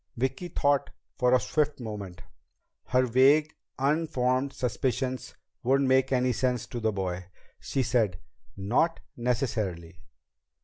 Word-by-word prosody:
Vicki 130 +8 -1
thought 145 -4 +1 0.3
for 125 -1 +3
a 130 - +6
swift 150 0 0
moment. 105 -6 -7 0.6
Her 130 0 +2
vague, 140 +5 +4 0.2
unformed 135 -2 +1
suspicions 130 +1 -2 0.3
wouldn't 135 +2 +2
make 130 0 +3
any 125 -1 +2
sense 125 -1 0
to 120 - -6
the 110 -1 +1
boy. 95 -2 -3 0.3
She 135 - -1
said: 110 -8 +1 0.4
"Not 120 - +1 0.2
necessarily. 110 - -2
125 Hz, 120 wpm, -28 LUFS, 110-135 Hz, 0.6 s, a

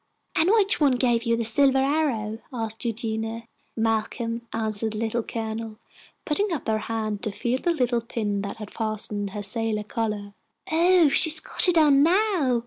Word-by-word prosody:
"And 325 +3 +3
which 405 -5 +2
one 280 -3 +4
gave 240 -1 +1
you 230 0 +1
the 230 - -1
silver 270 +4 +4
arrow?" 265 -6 0
asked 225 -3 -4
Eugenia. 225 0 -3 0.3
"Malcolm," 230 +1 -1
answered 220 -1 -2
the - - -5
Little 230 +1 -1
Colonel, 220 -1 -5 0.5
putting 400 +6 0
up 315 -7 -4
her 220 -1 +1
hand 215 -2 -3
to 215 - -3
feel 240 +5 -2
the - - 0
little 250 -7 +1
pin 210 -3 -3
that 205 +1 -7
fastened 215 -2 -3
her 205 +1 -6
sailor 215 +1 -2
collar. 210 -2 -4 0.4
"Oh, 345 +1 +5
she's 315 +2 +4
got - - +3
it 355 -2 +3
on 290 -3 +5
now!" 340 - +2
230 Hz, 165 wpm, -25 LUFS, 220-280 Hz, 0.5 s, Oh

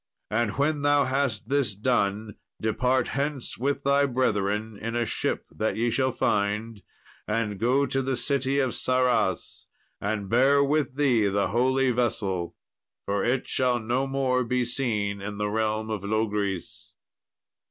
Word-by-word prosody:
And 110 0 0
when 145 +1 +1
thou 145 0 +4
hast 130 -6 -1
this 135 -6 +1
done, 105 -1 0 0.3
depart 125 +4 +1
hence 140 -4 -3
with 140 +2 -1
thy 140 +1 +3
brethren 110 -4 0
in 115 +3 -5
a 120 0 +1
ship - - -2
that 110 - -2
ye 115 +1 0
shall 130 +1 +1
find, 105 0 -1 0.5
and 105 -2 -1
go 130 +5 +2
to 135 -1 0
the 135 0 -1
city 135 +2 +1
of 130 -3 +1
Sarras. 125 -6 0 0.3
And 100 -1 -2
bear 135 +6 +4
with 140 -2 0
thee 125 -7 +3
the 100 -1 0
holy 130 +4 +2
vessel, 100 -7 -1 0.5
for 100 0 0
it 125 +2 0
shall 125 -2 +1
no 125 +4 -1
more 130 -2 +1
be 125 +1 0
seen 105 -5 -1
in 100 +1 -5
the 105 0 -1
realm 110 0 -1
of 105 -3 -3
Logris." 105 -3 -2
120 Hz, 150 wpm, -26 LUFS, 105-135 Hz, 0.5 s, thou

